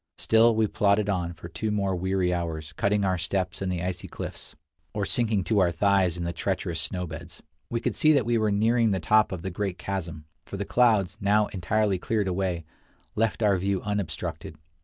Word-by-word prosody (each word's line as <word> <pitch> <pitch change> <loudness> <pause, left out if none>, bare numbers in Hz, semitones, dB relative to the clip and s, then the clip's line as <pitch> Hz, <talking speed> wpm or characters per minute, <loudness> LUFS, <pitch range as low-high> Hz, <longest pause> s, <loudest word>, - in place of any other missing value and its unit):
Still 115 +1 +4
we 110 0 +3
plodded 105 -1 +2
on 90 -3 -1
for 85 - -10
two 110 +6 -3
more 100 -2 0
weary 95 0 0
hours, 80 -3 -4
cutting 100 +5 +1
our 95 -2 +1
steps 90 +1 -2
in 95 - -1
the 90 -1 -2
icy 90 -1 -4
cliffs, - - -7 0.4
or 105 -1 0
sinking 110 -6 +1
to 105 +2 +1
our 90 -2 +3
thighs 95 0 +2
in 85 - -3
the 85 0 -2
treacherous 90 -1 -2
snow 90 -1 -3
beds. 85 +1 -9 0.3
We 115 0 -2
could - - -1
see 155 - +4
that 135 -6 +2
we 120 -1 +2
were 110 -1 +2
nearing 115 +3 +3
the 95 -2 0
top 110 +6 +3
of 90 -3 -5
the 95 - -3
great 95 0 -3
chasm, 85 -5 -5 0.2
for 100 - -7
the 100 - -3
clouds, 105 -6 +2
now 105 +2 +3
entirely 100 +1 0
cleared 105 0 -1
away, 90 -3 -1 0.5
left 115 +1 0
our 100 -3 +3
view 95 +1 0
unobstructed. 100 -7 -4
95 Hz, 200 wpm, -26 LUFS, 90-105 Hz, 0.5 s, Still